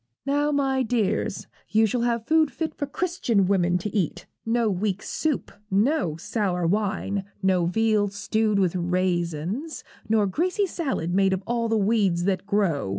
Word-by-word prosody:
'Now, 290 Hz, +1 st, +1 dB
my 270 Hz, -2 st, +1 dB
dears, 220 Hz, -5 st, -1 dB, 0.2 s
you 220 Hz, +1 st, +4 dB
shall 235 Hz, +3 st, 0 dB
have 235 Hz, -1 st, 0 dB
food 315 Hz, 0 st, +3 dB
fit 315 Hz, +4 st, -4 dB
for 285 Hz, -, -4 dB
Christian 275 Hz, -, 0 dB
women 180 Hz, -2 st, +2 dB
to 200 Hz, +3 st, -5 dB
eat. 185 Hz, -7 st, -1 dB, 0.2 s
No 230 Hz, 0 st, +2 dB
weak 195 Hz, 0 st, -1 dB
soup, 310 Hz, -4 st, -2 dB, 0.2 s
no 205 Hz, -, +1 dB
sour 180 Hz, 0 st, -1 dB
wine, 200 Hz, +1 st, 0 dB, 0.2 s
no 185 Hz, -3 st, +2 dB
veal 215 Hz, +2 st, +2 dB
stewed 210 Hz, +1 st, 0 dB
with 185 Hz, -3 st, +1 dB
raisins, 180 Hz, -, -1 dB, 0.3 s
nor 215 Hz, -2 st, +3 dB
greasy 360 Hz, -, 0 dB
salad 270 Hz, -, -2 dB
made 195 Hz, 0 st, +3 dB
of 190 Hz, +1 st, -2 dB
all 235 Hz, -1 st, -1 dB
the 225 Hz, -, +2 dB
weeds 200 Hz, -4 st, +2 dB
that 190 Hz, 0 st, -1 dB
grow. 190 Hz, -, +1 dB
210 Hz, 155 wpm, -25 LUFS, 185-240 Hz, 0.3 s, you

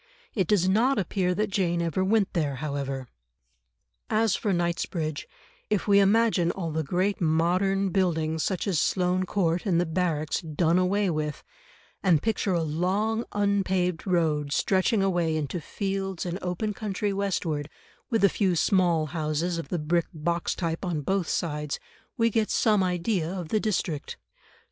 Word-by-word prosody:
It 190 Hz, -6 st, 0 dB
does 185 Hz, -2 st, +3 dB
not 230 Hz, +8 st, +3 dB
appear 185 Hz, -1 st, 0 dB
that 210 Hz, +1 st, -1 dB
Jane 175 Hz, -4 st, +1 dB
ever 170 Hz, +2 st, 0 dB
went 200 Hz, 0 st, +2 dB
there, 150 Hz, -5 st, 0 dB
however. 135 Hz, -2 st, -4 dB, 1.0 s
As 220 Hz, -2 st, +2 dB
for 205 Hz, -, -1 dB
Knightsbridge, 170 Hz, -3 st, -2 dB, 0.4 s
if 210 Hz, -2 st, 0 dB
we 200 Hz, -1 st, +6 dB
imagine 200 Hz, -3 st, +3 dB
all 170 Hz, -3 st, -3 dB
the 160 Hz, +1 st, -1 dB
great 185 Hz, +7 st, -1 dB
modern 180 Hz, +5 st, +2 dB
buildings 160 Hz, -4 st, 0 dB
such 185 Hz, +1 st, -1 dB
as 180 Hz, -6 st, +1 dB
Sloane 185 Hz, 0 st, +1 dB
Court 175 Hz, -3 st, 0 dB
and 170 Hz, -3 st, +3 dB
the 175 Hz, -, +2 dB
Barracks 160 Hz, -3 st, -1 dB
done 165 Hz, +1 st, +1 dB
away 190 Hz, +1 st, +1 dB
with, 150 Hz, -2 st, -3 dB, 0.6 s
and 175 Hz, -5 st, +4 dB
picture 210 Hz, 0 st, 0 dB
a 170 Hz, -, +1 dB
long 195 Hz, +9 st, 0 dB
unpaved 190 Hz, -4 st, 0 dB
road 155 Hz, -5 st, +1 dB
stretching 195 Hz, +4 st, +2 dB
away 175 Hz, -4 st, +1 dB
into 155 Hz, +3 st, -3 dB
fields 195 Hz, +1 st, -3 dB
and 180 Hz, +1 st, -3 dB
open 185 Hz, +4 st, -2 dB
country 205 Hz, 0 st, -2 dB
westward, 170 Hz, -7 st, -2 dB, 0.4 s
with 225 Hz, -4 st, +1 dB
a -, -, +8 dB
few 190 Hz, -2 st, +1 dB
small 170 Hz, -3 st, +2 dB
houses 160 Hz, +2 st, -2 dB
of 150 Hz, -, -7 dB
the 180 Hz, -, -1 dB
brick 165 Hz, +2 st, 0 dB
box 170 Hz, +2 st, -2 dB
type 165 Hz, 0 st, -3 dB
on 170 Hz, -5 st, -1 dB
both 190 Hz, +3 st, 0 dB
sides, 150 Hz, -3 st, -2 dB, 0.4 s
we 230 Hz, 0 st, +3 dB
get 215 Hz, 0 st, +1 dB
some 215 Hz, -4 st, +3 dB
idea 180 Hz, -1 st, 0 dB
of 180 Hz, -4 st, -5 dB
the 215 Hz, -, +2 dB
district. 175 Hz, -8 st, -2 dB
180 Hz, 160 wpm, -27 LUFS, 160-195 Hz, 1.0 s, a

